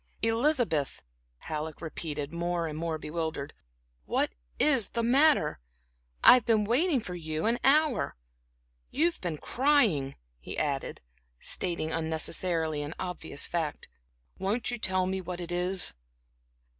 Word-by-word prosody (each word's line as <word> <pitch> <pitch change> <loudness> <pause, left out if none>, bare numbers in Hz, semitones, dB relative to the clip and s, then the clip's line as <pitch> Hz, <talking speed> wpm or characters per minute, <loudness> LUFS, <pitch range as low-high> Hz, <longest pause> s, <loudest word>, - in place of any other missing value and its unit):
"Elizabeth," 225 - +1 0.3
Halleck 155 - -5
repeated, 155 -2 -5
more 170 0 -1
and 155 -2 -4
more 160 0 -2
bewildered, 155 -2 -4 0.5
"what - - +1 0.3
is 270 -9 +3
the 235 - -2
matter? 265 - +4 0.6
I've 250 -2 +9
been 220 -2 +3
waiting 275 - +2
for 200 -5 -7
you 160 -1 -3
an 235 +2 +2
hour. 295 0 +3 0.7
You've 335 +4 0
been 170 -4 -3
crying," 230 - +2 0.2
he - - -8
added, 140 -3 -2 0.4
stating 170 -3 -1
unnecessarily 160 0 -1
an 145 +3 -6
obvious 180 -5 -3
fact. 160 -4 -3 0.5
"Won't 205 +6 -1
you 240 - -4
tell 185 -2 +1
me 190 +1 -2
what 180 0 -6
it 175 0 -6
is?" 180 - +1
175 Hz, 125 wpm, -29 LUFS, 155-235 Hz, 0.7 s, I've